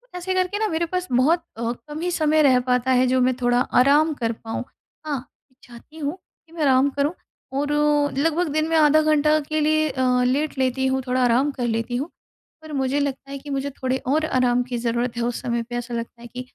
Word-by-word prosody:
ऐसे 360 +1 -3
करके 370 +2 0
ना 435 - +1
मेरे 335 -2 -1
पास 365 +2 -3
बहुत 300 +8 +3
अ, 230 0 -1
कम 295 +6 -8
ही 355 +1 -1
समय 310 -2 +2
रह 260 -4 +5
पाता 250 +1 +2
है, 255 0 +4
जो 255 +1 +2
मैं 255 0 +2
थोड़ा 245 0 +3 0.2
आराम 295 +4 +4
कर 230 -5 -2
पाऊँ। 225 +1 -5 0.4
हाँ, 280 -4 -3 0.4
चाहती 245 +6 -15
हूँ 295 +1 -3 0.3
कि 325 - -21
मैं 335 - -6
आराम 270 0 +4
करूँ 285 +3 -1 0.5
और 290 +1 -1 0.5
लगभग 330 +4 +1
दिन 310 +1 +1
में 325 - +2
आधा 310 0 +5
घंटा 305 0 +3
के 310 0 0
लिए 310 +1 +2
अ, 255 -2 +1
लेट 280 +4 0
लेती 265 0 +1
हूँ, 265 0 0
थोड़ा 255 0 +1
आराम 250 +4 +3
कर 250 -3 -3
लेती 230 +1 -2
हूँ। 280 +7 -2 0.5
पर 315 -1 -10
मुझे 270 0 0
लगता 275 -1 -3
है 280 - -4
कि 290 +2 -11
मुझे 275 0 -2
थोड़े 260 -1 -2
और 310 +4 +2
आराम 250 -4 +2
की 245 -1 -4
ज़रूरत 235 +1 -1
है, - - -1
उस 240 0 -2
समय 235 -1 -1
पे 240 +1 -8
ऐसा 240 0 -5
लगता 235 0 -5
है 240 - -9
कि 250 +1 -7
270 Hz, 225 wpm, -23 LUFS, 250-310 Hz, 0.5 s, रह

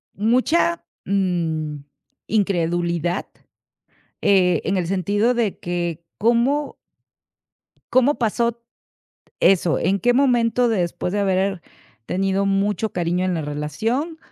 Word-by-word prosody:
Mucha, 255 - +1 0.2
mm, 170 -6 -1 0.5
incredulidad, 175 -3 0 1.0
eh, 180 -4 +3
en 195 - 0
el 175 - -1
sentido 205 +6 +1
de 225 -5 -1
que, 175 -1 -3
¿cómo? 240 +7 +1 1.2
¿Cómo 260 +3 +4
pasó 235 0 0
t 235 - -27 0.8
eso? 180 -3 +3
¿En 195 +3 0
qué 245 0 +3
momento, 245 -2 +2
después 180 -2 -1
de 205 - +1
haber 190 -1 0 0.4
tenido 195 +6 0
mucho 200 +2 0
cariño 175 +1 -1
en 185 - 0
la 165 - -1
relación, 215 - -3
195 Hz, 110 wpm, -21 LUFS, 175-235 Hz, 1.2 s, Cómo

